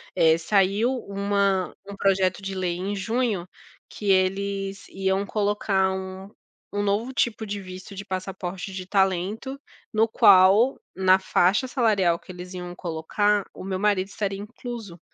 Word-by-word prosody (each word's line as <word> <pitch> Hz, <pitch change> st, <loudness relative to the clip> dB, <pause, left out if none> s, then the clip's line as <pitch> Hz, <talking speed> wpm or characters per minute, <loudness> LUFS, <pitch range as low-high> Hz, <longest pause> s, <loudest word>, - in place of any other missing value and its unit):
eh, 165 Hz, -2 st, +5 dB
saiu 200 Hz, +6 st, +2 dB, 0.2 s
uma 200 Hz, -1 st, 0 dB
um 200 Hz, -, -6 dB
projeto 190 Hz, -1 st, +2 dB
de 195 Hz, 0 st, -5 dB
lei 180 Hz, -2 st, -1 dB
em 195 Hz, +3 st, -3 dB
junho, 220 Hz, -2 st, -1 dB, 0.4 s
que 205 Hz, -2 st, -1 dB
eles 195 Hz, +1 st, 0 dB
iam 190 Hz, +1 st, 0 dB
colocar 200 Hz, -2 st, +1 dB
um 190 Hz, +1 st, -6 dB, 0.4 s
um 205 Hz, 0 st, 0 dB
novo 205 Hz, +5 st, 0 dB
tipo 230 Hz, -4 st, 0 dB
de 205 Hz, 0 st, -3 dB
visto 185 Hz, +2 st, -10 dB
de 195 Hz, +1 st, -7 dB
passaporte 185 Hz, 0 st, -5 dB
de 185 Hz, -1 st, -5 dB
talento, 195 Hz, +7 st, 0 dB, 0.3 s
no 220 Hz, +1 st, +3 dB
qual, 200 Hz, +4 st, +6 dB, 0.2 s
na 185 Hz, 0 st, +5 dB
faixa 190 Hz, +6 st, +2 dB
salarial 205 Hz, -10 st, +2 dB
que -, -, -12 dB
eles 180 Hz, +1 st, -9 dB
iam 180 Hz, -1 st, -6 dB
colocar, 190 Hz, +5 st, 0 dB
o -, -, -8 dB
meu 190 Hz, 0 st, -3 dB
marido 200 Hz, -2 st, +2 dB
estaria 200 Hz, -1 st, -3 dB
incluso, 215 Hz, -3 st, -8 dB
195 Hz, 145 wpm, -25 LUFS, 185-205 Hz, 0.4 s, qual